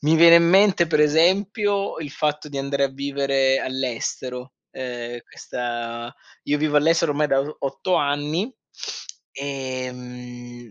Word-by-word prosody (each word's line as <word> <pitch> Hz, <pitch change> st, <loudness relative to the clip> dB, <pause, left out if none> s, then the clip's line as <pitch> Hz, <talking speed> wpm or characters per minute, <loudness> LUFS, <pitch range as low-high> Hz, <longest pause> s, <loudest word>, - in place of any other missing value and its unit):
mi 150 Hz, +2 st, +3 dB
viene 170 Hz, +1 st, +8 dB
in 170 Hz, 0 st, +5 dB
mente 190 Hz, -1 st, +5 dB
per 155 Hz, -2 st, +2 dB
esempio 195 Hz, +6 st, +2 dB
il 150 Hz, -3 st, -6 dB
fatto 150 Hz, +1 st, -2 dB
di 145 Hz, -, -8 dB
andare 140 Hz, 0 st, 0 dB
a -, -, +1 dB
vivere 135 Hz, -1 st, +1 dB
all'estero, 130 Hz, 0 st, -4 dB, 0.2 s
ehm, 120 Hz, -2 st, -6 dB
questa 120 Hz, -1 st, -5 dB, 0.3 s
io 150 Hz, +1 st, +1 dB
vivo 150 Hz, 0 st, +1 dB
all'estero 165 Hz, +1 st, +3 dB
ormai 150 Hz, +1 st, +1 dB
da 135 Hz, -2 st, +2 dB
o 145 Hz, +2 st, -5 dB
8 140 Hz, +7 st, -2 dB
anni, 145 Hz, -, 0 dB, 0.8 s
ehm 125 Hz, -3 st, -7 dB
140 Hz, 135 wpm, -23 LUFS, 125-155 Hz, 0.8 s, viene